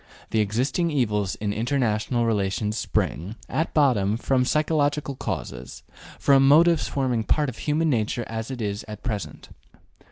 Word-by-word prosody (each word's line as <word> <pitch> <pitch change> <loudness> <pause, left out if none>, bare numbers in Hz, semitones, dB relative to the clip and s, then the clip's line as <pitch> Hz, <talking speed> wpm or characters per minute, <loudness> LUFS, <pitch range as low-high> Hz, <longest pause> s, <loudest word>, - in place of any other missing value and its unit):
The 110 - +1
existing 125 - 0
evils 105 - 0
in 100 -1 -3
international 120 -1 0
relations 105 -1 0
spring, 95 -2 -2
at 160 +5 -1
bottom, 110 -9 +3
from 125 +1 +1
psychological 150 -1 0
causes, 65 - -6 0.3
from 135 -1 +4
motives 165 +3 +5
forming 125 -5 -1
part 150 +5 +1
of 120 - -9
human 155 +1 +1
nature 115 0 0
as 110 +1 -5
it 125 -4 -4
is 100 0 -3
at 105 -1 -9
present. 100 - -5
120 Hz, 140 wpm, -24 LUFS, 105-140 Hz, 0.3 s, motives